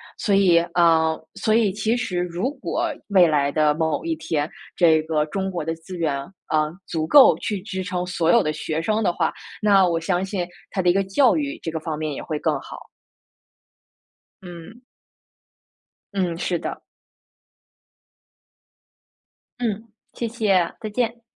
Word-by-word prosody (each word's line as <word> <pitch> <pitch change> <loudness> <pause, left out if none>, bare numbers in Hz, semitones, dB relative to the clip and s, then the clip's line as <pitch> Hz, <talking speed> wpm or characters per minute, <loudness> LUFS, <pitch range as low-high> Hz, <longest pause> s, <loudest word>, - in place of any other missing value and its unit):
所 200 -3 +1
以， 180 -4 +5
啊， 165 -2 +4 0.2
所 220 -1 +1
以 220 -4 +3
其 220 +4 0
实 180 -7 -2
如 180 +8 -2
果 325 +4 -2
未 190 -4 +5
来 145 -2 +1
的 150 0 +3
某 160 +1 -1
一 165 - -1
天， 155 -2 -2 0.3
这 160 -3 +4
个 155 -1 0
中 190 +5 -3
国 170 -4 -4
的 165 - -1
资 170 +3 -9
源， 155 -4 0 0.3
呃， 155 0 +1
足 160 -1 -3
够 285 -3 +8
去 205 -3 -3
支 190 -3 -4
撑 180 0 -3
所 170 -2 +1
有 - - +5
的 155 - -1
学 155 +1 -3
生 215 +6 0
的 175 - +2
话， - - -1 0.3
那 195 -3 +4
我 165 -1 0
相 180 +2 -1
信 190 -3 -3 0.2
它 190 - -2
的 180 - +4
一 175 - +5
个 195 - +2
教 225 +7 +3
育 295 +1 -3
这 165 - -3
个 160 - -3
方 155 -1 -4
面 155 -1 -3
也 - - -6
会 155 - -4
更 150 -2 0
好。 - - -10 1.6
嗯。 175 +8 -11 1.3
嗯， 180 -4 -1
是 175 -1 -1
的。 - - -6 2.8
嗯， 225 -1 -2 0.3
谢 235 - -3
谢， 205 -7 +1
再 215 - -4
见。 235 +1 -2
180 Hz, 175 characters per minute, -23 LUFS, 160-210 Hz, 2.8 s, 够